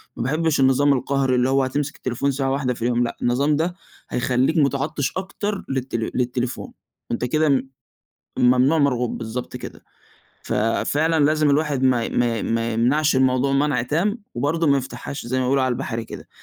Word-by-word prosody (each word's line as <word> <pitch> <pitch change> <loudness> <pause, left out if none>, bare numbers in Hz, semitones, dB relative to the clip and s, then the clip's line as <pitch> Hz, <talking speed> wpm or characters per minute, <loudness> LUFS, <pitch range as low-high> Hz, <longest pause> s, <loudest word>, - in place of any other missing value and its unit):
ما - - -3
باحبش 155 +4 0
النظام 135 +2 +4
القهري 135 0 0
اللي 125 +1 +2
هو 135 0 +3
هتمسك 140 +2 -2
التليفون 130 +3 -2
ساعة 135 0 -1
واحدة 135 -2 0
في 115 - -12
اليوم. 120 +1 +1
لأ، 120 - -4
النظام 140 +5 +2
ده 170 +4 -1 0.3
هيخليك 130 +6 +1
مُتعطش 140 -2 0
أكتر 200 +2 -4
للت 130 -2 -3
للتليفون، 125 +2 -2 0.4
وأنت 120 - -1
كده 145 +1 +2 0.8
الممنوع 125 +5 +4
مرغوب، 125 -5 +1
بالضبط 115 +2 -5
كده. - - -9 0.6
ففعلًا 150 +8 +1
لازم 155 0 +3
الواحد 145 -2 +1
ما 125 -3 +3
ي - - -3
ما 120 -2 +1
ي - - -4
ما 115 0 -1
يمنعش 130 +7 +2
الموضوع 130 +1 +2
منع 140 -3 +1
تام 170 - 0 0.2
وبرضه 155 +7 0
ما 140 -1 +4
يفتحهاش 135 +1 -6
زي 130 +2 -1
ما 130 - 0
بيقولوا 135 +1 +2
على 130 -1 +1
البحرى 120 -2 -4
كده. - - -10
135 Hz, 170 wpm, -22 LUFS, 125-145 Hz, 0.8 s, النظام